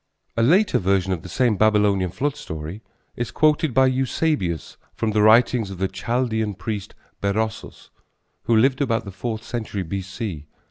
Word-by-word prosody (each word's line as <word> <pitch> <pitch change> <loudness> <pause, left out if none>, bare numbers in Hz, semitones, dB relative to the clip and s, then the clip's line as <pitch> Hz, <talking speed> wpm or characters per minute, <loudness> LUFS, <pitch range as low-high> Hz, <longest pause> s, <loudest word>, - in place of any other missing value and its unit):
A 115 - +1
later 180 - +4
version 95 0 +1
of 85 - -4
the 90 - -10
same 115 +2 +1
Babylonian 105 -3 +3
flood 145 - -2
story 80 - -7 0.3
is 120 -1 -3
quoted 155 +2 +2
by 130 +2 +4
Eusebius 130 - -1 0.2
from 110 - -1
the 105 0 +2
writings 110 0 +4
of 95 - -7
the 95 +1 0
Chaldean 110 +1 -1
priest 100 +1 -5 0.3
Berossus 110 +2 -3 0.5
who 115 - +3
lived 130 +4 +3
about 115 -6 0
the 100 - -7
fourth 110 +3 -4
century 110 -5 -4
B.C. 95 -2 -5
110 Hz, 155 wpm, -23 LUFS, 95-125 Hz, 0.5 s, later